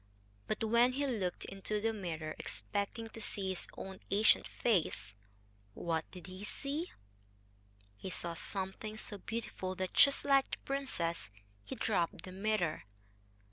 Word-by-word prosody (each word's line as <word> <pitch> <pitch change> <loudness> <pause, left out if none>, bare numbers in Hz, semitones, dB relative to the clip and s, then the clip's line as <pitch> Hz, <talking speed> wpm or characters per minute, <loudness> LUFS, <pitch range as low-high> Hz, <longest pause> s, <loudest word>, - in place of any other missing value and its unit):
But 215 - 0
when 235 +3 +5
he 285 +2 +1
looked 205 -9 -1
into 195 +2 -2
the 225 +2 +1
mirror, 160 -6 -3
expecting 200 - -2
to 225 - -7
see 195 -2 0
his 185 - -2
own 190 0 -6
ancient 210 +2 +5
face 155 - +1 0.6
what 165 -2 -1
did 180 -2 -10
he 185 +1 -8
see? 285 +10 -3 1.1
He 190 - -5
saw 170 -2 -3
something 195 +5 -3
so 205 -1 -4
beautiful 190 -4 -3
that, 185 0 -2
just 280 0 +6
like 275 -1 +5
the - - -2
princess, 170 - 0 0.3
he 100 - -5
dropped 185 -4 +1
the 185 - -7
mirror. 190 - +1
195 Hz, 140 wpm, -35 LUFS, 175-225 Hz, 1.1 s, just